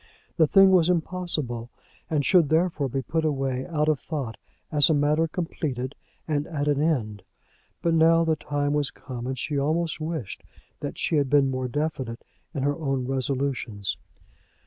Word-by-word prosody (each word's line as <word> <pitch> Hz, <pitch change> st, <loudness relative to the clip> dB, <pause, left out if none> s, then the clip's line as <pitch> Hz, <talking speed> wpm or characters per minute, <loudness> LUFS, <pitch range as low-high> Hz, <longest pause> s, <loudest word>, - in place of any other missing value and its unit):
The 160 Hz, -3 st, +4 dB
thing 195 Hz, +4 st, +7 dB
was 180 Hz, -2 st, +5 dB
impossible, 160 Hz, -9 st, -1 dB, 0.4 s
and 150 Hz, -3 st, +1 dB
should 165 Hz, 0 st, +5 dB
therefore 160 Hz, -4 st, +1 dB
be 135 Hz, +1 st, -2 dB
put 160 Hz, +3 st, -1 dB
away 135 Hz, -4 st, -1 dB
out 150 Hz, -3 st, 0 dB
of 155 Hz, -3 st, +2 dB
thought, 140 Hz, -8 st, -4 dB, 0.4 s
as 150 Hz, -1 st, +4 dB
a 160 Hz, -, +4 dB
matter 150 Hz, +3 st, +2 dB
completed 145 Hz, -6 st, -3 dB, 0.3 s
and 150 Hz, -2 st, 0 dB
at 145 Hz, -3 st, -2 dB
an 145 Hz, -1 st, +2 dB
end. 115 Hz, -11 st, 0 dB, 0.6 s
But 170 Hz, -, +2 dB
now 165 Hz, +1 st, +5 dB
the 160 Hz, -1 st, +2 dB
time 145 Hz, -1 st, -1 dB
was 145 Hz, -2 st, +1 dB
come, 125 Hz, -2 st, -7 dB
and 130 Hz, 0 st, -3 dB
she 145 Hz, +3 st, -1 dB
almost 160 Hz, +3 st, 0 dB
wished 155 Hz, -, -4 dB, 0.4 s
that -, -, -5 dB
she 160 Hz, -, +1 dB
had 140 Hz, -2 st, +1 dB
been 140 Hz, -1 st, +4 dB
more 130 Hz, -1 st, -2 dB
definite 130 Hz, -3 st, -3 dB, 0.3 s
in 140 Hz, -5 st, -3 dB
her 145 Hz, +1 st, +1 dB
own 135 Hz, -5 st, -1 dB
resolutions. 130 Hz, -6 st, -2 dB
145 Hz, 170 wpm, -26 LUFS, 130-160 Hz, 0.6 s, thing